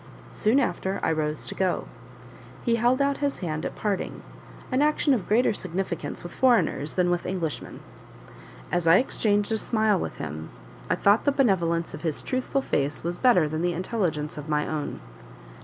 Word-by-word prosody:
Soon 225 Hz, +6 st, +2 dB
after 195 Hz, -7 st, -1 dB
I -, -, +2 dB
rose 155 Hz, -1 st, -1 dB
to -, -, -6 dB
go. 185 Hz, -2 st, 0 dB, 0.8 s
He 235 Hz, -2 st, +3 dB
held 245 Hz, +4 st, +3 dB
out 280 Hz, 0 st, +1 dB
his 285 Hz, -1 st, -1 dB
hand 155 Hz, -4 st, -3 dB
at -, -, -9 dB
parting 205 Hz, -3 st, -3 dB, 0.5 s
an 255 Hz, +2 st, +2 dB
action 300 Hz, -1 st, +3 dB
of 220 Hz, -8 st, -1 dB
greater 225 Hz, +2 st, +3 dB
significance 185 Hz, -2 st, -4 dB
with 175 Hz, -, -7 dB
foreigners 235 Hz, -, +2 dB
than 180 Hz, -1 st, +2 dB
with 175 Hz, -, -1 dB
Englishmen. 170 Hz, -5 st, -4 dB, 0.9 s
As 175 Hz, -1 st, 0 dB
I 165 Hz, +3 st, +8 dB
exchanged 205 Hz, -4 st, +1 dB
a 220 Hz, -, +1 dB
smile 215 Hz, -4 st, +2 dB
with -, -, -4 dB
him, 80 Hz, +1 st, -6 dB, 0.4 s
I -, -, +3 dB
thought 205 Hz, +3 st, +3 dB
the 285 Hz, -, +4 dB
benevolence 170 Hz, -, +1 dB
of -, -, -7 dB
his 160 Hz, -4 st, -2 dB
truthful 260 Hz, +1 st, -1 dB
face 140 Hz, +2 st, 0 dB
was 175 Hz, +1 st, -3 dB
better 235 Hz, -12 st, +5 dB
than 155 Hz, +1 st, -3 dB
the 175 Hz, 0 st, +1 dB
intelligence 170 Hz, -6 st, -2 dB
of 150 Hz, +1 st, -8 dB
my 150 Hz, -1 st, +1 dB
own. 155 Hz, -2 st, -4 dB
185 Hz, 175 wpm, -26 LUFS, 160-235 Hz, 0.9 s, I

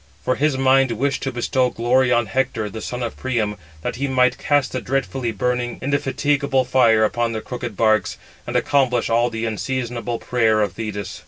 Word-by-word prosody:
For 130 Hz, -, +2 dB
his 145 Hz, 0 st, +1 dB
mind 135 Hz, -1 st, +3 dB
wished 135 Hz, +4 st, -1 dB
to 135 Hz, -, -2 dB
bestow 125 Hz, +1 st, +1 dB
glory 125 Hz, +2 st, +2 dB
on 120 Hz, -1 st, +3 dB
Hector, 115 Hz, -1 st, -1 dB
the 110 Hz, -, -7 dB
son 125 Hz, 0 st, -4 dB
of 120 Hz, -, -4 dB
Priam, 115 Hz, -5 st, -1 dB, 0.3 s
that -, -, -3 dB
he 140 Hz, +2 st, -1 dB
might 125 Hz, -1 st, +2 dB
cast 145 Hz, -2 st, +1 dB
the 130 Hz, -, -3 dB
dreadfully 135 Hz, -2 st, -2 dB
burning, 120 Hz, +2 st, -2 dB
indefatigable 140 Hz, 0 st, 0 dB
fire 115 Hz, -4 st, +4 dB
upon 115 Hz, +1 st, 0 dB
the 110 Hz, -, -3 dB
crooked 120 Hz, -4 st, -6 dB
barks; 110 Hz, -3 st, +2 dB, 0.3 s
and -, -, -4 dB
accomplish 125 Hz, -5 st, +2 dB
all 120 Hz, +1 st, +3 dB
the 115 Hz, -1 st, -4 dB
unseasonable 120 Hz, +1 st, -3 dB
prayer 110 Hz, -3 st, +1 dB
of 100 Hz, -4 st, 0 dB
Thetis. 105 Hz, -1 st, -5 dB
125 Hz, 180 wpm, -21 LUFS, 115-130 Hz, 0.3 s, fire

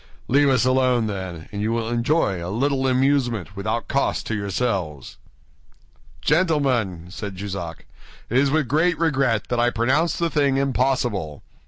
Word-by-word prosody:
Leave 140 Hz, +2 st, +4 dB
us 125 Hz, -3 st, +3 dB
alone, 130 Hz, -2 st, +2 dB
then, 95 Hz, -6 st, -5 dB
and 100 Hz, -, -4 dB
you 110 Hz, +2 st, 0 dB
will 115 Hz, -1 st, -1 dB
enjoy 120 Hz, -, 0 dB
a 85 Hz, -, -4 dB
little 135 Hz, +5 st, 0 dB
amusement 125 Hz, -, +1 dB
without 110 Hz, +4 st, -2 dB
cost 140 Hz, 0 st, 0 dB
to -, -, -3 dB
yourselves." 100 Hz, -, -2 dB, 1.0 s
"Gentlemen," 130 Hz, -, +1 dB
said 100 Hz, 0 st, -6 dB
Jussac, 95 Hz, -4 st, -6 dB, 0.4 s
"it 120 Hz, -, 0 dB
is 140 Hz, 0 st, +3 dB
with 155 Hz, -2 st, +1 dB
great 160 Hz, +6 st, +2 dB
regret 135 Hz, -9 st, +1 dB
that 120 Hz, -, 0 dB
I 120 Hz, +1 st, +3 dB
pronounce 130 Hz, +8 st, +1 dB
the 170 Hz, -1 st, 0 dB
thing 140 Hz, -2 st, +2 dB
impossible. 125 Hz, -, 0 dB
120 Hz, 150 wpm, -23 LUFS, 100-140 Hz, 1.0 s, Leave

